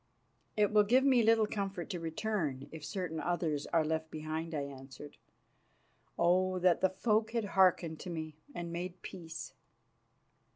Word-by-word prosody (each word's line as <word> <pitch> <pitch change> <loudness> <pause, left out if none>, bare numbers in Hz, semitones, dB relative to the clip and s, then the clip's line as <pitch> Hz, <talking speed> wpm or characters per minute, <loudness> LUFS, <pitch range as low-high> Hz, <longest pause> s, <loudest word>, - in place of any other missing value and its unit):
"It 210 -1 +3
will 210 - +7
give 250 +6 +4
me 260 -3 +5
little 225 0 +5
comfort 195 -4 -3
to 180 - -3
return 165 -5 -2
if 160 -2 -9
certain 175 -2 -3
others 160 -4 -1
are 165 -2 +2
left 160 0 -1
behind," 155 +1 -4
I 145 - 0
answered. 135 +1 -10 1.0
"Oh, 185 +2 +3
that 180 -2 +3
the 190 - +4
folk 215 +4 +1
had 230 -3 0
hearkened 180 -4 +3
to 185 - -7
me 160 -2 -5 0.2
and 170 -1 -4
made 180 +1 -5
peace!" 165 -3 -7
175 Hz, 155 wpm, -33 LUFS, 160-195 Hz, 1.0 s, will